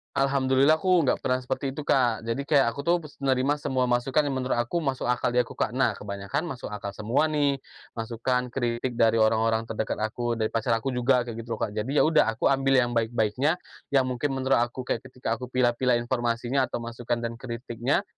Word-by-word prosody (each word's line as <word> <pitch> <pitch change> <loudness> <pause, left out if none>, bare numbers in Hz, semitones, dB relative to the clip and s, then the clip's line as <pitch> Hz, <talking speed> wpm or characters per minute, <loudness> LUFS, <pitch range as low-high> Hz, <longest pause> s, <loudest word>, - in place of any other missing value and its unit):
Alhamdulillah, 135 +1 +3
aku 175 -2 +2
nggak - - +1
pernah 130 0 +1
seperti 130 +1 -3
itu, 145 +2 -7
Kak. 120 -4 +3
Jadi, 115 +4 -1
kayak, 140 -5 +3
aku 140 - -5
tuh 170 +3 +2
menerima 140 -2 0
semua 130 -4 -1
masukan 130 +4 +1
yang 135 - -1
menurut 130 -2 0
aku 140 +8 -1
masuk 135 -4 -2
akal 125 0 +1
di 125 - +2
aku, 120 - -2
Kak. - - -1
Nah, - - +1
kebanyakan 100 +6 -4
masuk 125 - -6
akal 105 -1 -5
semua 115 +10 0
nih, 145 -2 +2 0.4
masukan, 120 +2 -2
kritik 120 -1 -2
dari 115 0 +4
orang-orang 110 0 +2
terdekat 110 -1 -3
aku, 120 +2 -1
dari 110 -1 -1
pacar 115 +1 +1
aku 135 - -1
juga, 125 0 +2
kayak 115 -1 -7
gitu 115 0 -4
loh, - - -13
Kak. - - -2
Jadi, 110 +7 -3
ya - - +5
udah, 155 -6 +4
aku 110 +4 +1
ambil 135 0 +2
yang 120 -2 +3
baik-baiknya, 115 +5 +1 0.3
yang 135 -2 +3
mungkin 130 +2 -2
menurut 130 -1 +2
aku 120 +2 -2
kayak 120 - -1
ketika 125 -3 -3
aku 125 - -6
pilah-pilah 125 0 +2
informasinya 120 +2 0
atau 120 - -4
masukan 120 0 -3
dan 115 0 -4
kritiknya, 120 - -2
125 Hz, 205 wpm, -26 LUFS, 115-135 Hz, 0.4 s, ya